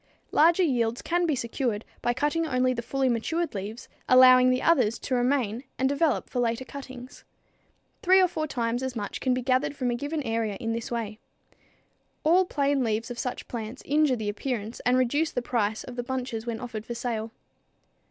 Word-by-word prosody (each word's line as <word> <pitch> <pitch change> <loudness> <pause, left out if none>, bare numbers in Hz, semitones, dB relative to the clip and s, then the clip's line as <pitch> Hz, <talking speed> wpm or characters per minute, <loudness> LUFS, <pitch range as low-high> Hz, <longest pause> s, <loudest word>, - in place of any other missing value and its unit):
Larger 335 +4 +5
yields 240 -6 0
can 350 0 +1
be 305 - +1
secured 235 -3 -2 0.2
by 240 - +1
cutting 295 +6 0
only 255 -2 +2
the 235 - -3
fully 265 +3 -1
matured 320 +8 -1
leaves, 210 +3 -6 0.2
allowing 255 0 +8
the 255 0 +1
others 250 -9 +3
to 260 - -4
remain 245 -2 +1
and 265 - +2
develop 285 +3 +1
for 250 - -3
later 235 +1 0
cuttings. 260 -2 -10 0.8
Three 375 +1 +5
or 370 - +5
four 310 -3 -3
times 240 -3 -1
as 260 -1 -3
much 205 -3 -4
can 255 -1 +2
be 255 - -3
gathered 260 +3 +1
from 250 -3 -1
a - - 0
given 290 +4 -3
area 225 -3 -1
in 225 +3 -3
this 230 0 -4
way. 225 -2 -4 1.0
All 355 +4 +4
plain 280 -4 +1
leaves 225 +1 -1
of 240 - -6
such 250 - -4
plants 230 +1 -6
injure 295 -2 +3
the 220 -3 -4
appearance 225 0 -4
and 250 +1 +4
reduce 285 +6 +2
the 245 - -2
price 220 -3 -1
of 250 - -9
the 245 - -3
bunches 245 -3 -4
when 230 -1 -3
offered 230 -3 -6
for 235 - -4
sale. 230 -2 -3
250 Hz, 190 wpm, -27 LUFS, 230-280 Hz, 1.0 s, allowing